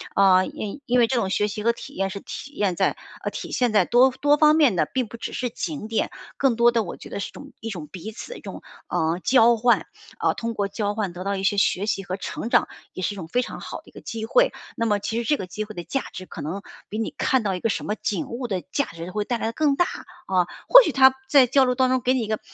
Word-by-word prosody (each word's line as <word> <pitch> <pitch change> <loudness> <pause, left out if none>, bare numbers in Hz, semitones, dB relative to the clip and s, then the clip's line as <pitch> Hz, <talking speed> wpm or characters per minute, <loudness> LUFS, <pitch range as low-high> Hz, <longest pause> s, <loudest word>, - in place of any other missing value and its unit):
啊， 185 -1 +5
因 215 +7 -6
因 245 +1 +2
为 235 - +5
这 260 - -1
种 195 -5 0
学 210 +1 +1
习 210 0 -5
和 235 - +4
体 - - -10
验 195 0 -1
是 200 +1 -6
体 285 - -8
验 200 -9 0
在 - - +1 0.3
呃， - - -2
体 - - -6
现 245 -3 +1
在 195 -4 +4
多 255 +2 +5
多 290 +3 +2
方 305 0 +6
面 290 -10 +4
的， 155 -3 +2
并 255 -4 0
不 230 - -10
只 - - -6
是 245 -1 -2
景 280 -3 -5
点。 225 - 0 0.3
更 265 -4 +2
多 235 +1 +5
的 230 -2 +1
我 175 - -7
觉 - - -11
得 200 - -5
是 - - -4
一 - - -17
种 285 0 -12
一 225 - -5
种 165 -7 -6
彼 185 +6 -8
此 235 - -9
的 - - -7
一 - - -13
种， - - -8 0.3
呃， 165 +2 0
交 235 -2 +5
换， 240 +2 +3 0.3
啊， - - +1
通 230 0 -4
过 200 -2 -1
交 205 0 -2
换 200 -5 -2
得 180 +1 -6
到 200 0 -1
一 190 - -4
些 205 +1 +2
学 195 0 +2
习 195 -2 -1
和 185 -1 -4
成 225 - -5
长， - - +4 0.3
也 185 - -6
是 205 - 0
一 - - -11
种 165 - -6
非 245 +9 +1
常 - - -6
好 - - -6
的 - - -14
一 - - -15
个 - - -11
机 225 -2 -5
会。 - - +3 0.3
那 230 - 0
么 205 -2 +2
其 220 +3 -3
实 235 - -2
这 295 - +3
个 185 - -5
机 210 +4 -4
会 215 0 -11
的 175 - -5
价 270 - -2
值 185 - -7
可 - - -9
能 180 +7 -4 0.3
比 215 - -4
你 225 - -2
看 260 -4 +2
到 195 -2 0
一 - - -4
个 225 - 0
什 - - -2
么 210 - -1
景 200 -4 -2
物 240 +1 -4
的 190 -4 -2
价 280 - +1
值 165 +2 -8
会 210 +1 -2
带 240 +1 -1
来 - - -3
的 230 - -3
更 290 +1 +2
大， 350 - +3 0.4
啊， 185 -2 +2 0.2
或 - - +11
许 - - 0
他 265 -1 +6
在 270 -3 +6
交 265 +2 +4
流 250 0 +1
当 255 0 +3
中 255 0 +1
给 250 +2 +2
你 255 - +1
一 - - -4
个 215 0 -1
225 Hz, 320 characters per minute, -24 LUFS, 195-255 Hz, 0.4 s, 或